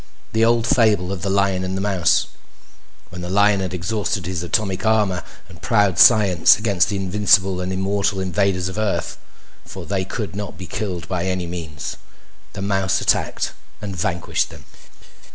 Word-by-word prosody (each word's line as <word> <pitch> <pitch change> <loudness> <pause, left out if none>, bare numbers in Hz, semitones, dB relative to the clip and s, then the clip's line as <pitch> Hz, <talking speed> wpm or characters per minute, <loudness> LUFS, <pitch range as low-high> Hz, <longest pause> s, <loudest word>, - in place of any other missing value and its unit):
The 110 0 +2
old 115 0 +3
fable 110 -6 +2
of 95 -3 -4
the 100 - -2
lion 100 -1 +1
and 95 +1 -3
the - - -2
mouse. 95 -4 +2 0.9
When 90 0 -8
the 90 - -5
lion 100 +1 +3
had 95 -2 -3
exhausted 95 +1 -2
his 90 -2 -3
atomic 95 +1 -1
armor 105 -5 +1 0.3
and - - -15
proud 100 -5 +2
science 100 -7 +6
against 100 -4 +1
the 105 - -2
invincible 95 -1 +2
and 90 +1 -3
immortal 100 +1 -1
invaders 95 -1 0
of 95 +3 -5
Earth 95 -6 -2 0.4
for - - -9
they 95 -2 -1
could 100 +1 -5
not 100 -1 -6
be 95 - -7
killed 100 -7 -5
by 90 -1 -2
any 95 -1 -2
means 80 -5 -6 0.6
the 100 - -5
mouse 95 -1 0
attacked - - 0 0.3
and 100 -2 -6
vanquished 85 0 -1
them. - - -14
95 Hz, 170 wpm, -21 LUFS, 90-105 Hz, 0.9 s, science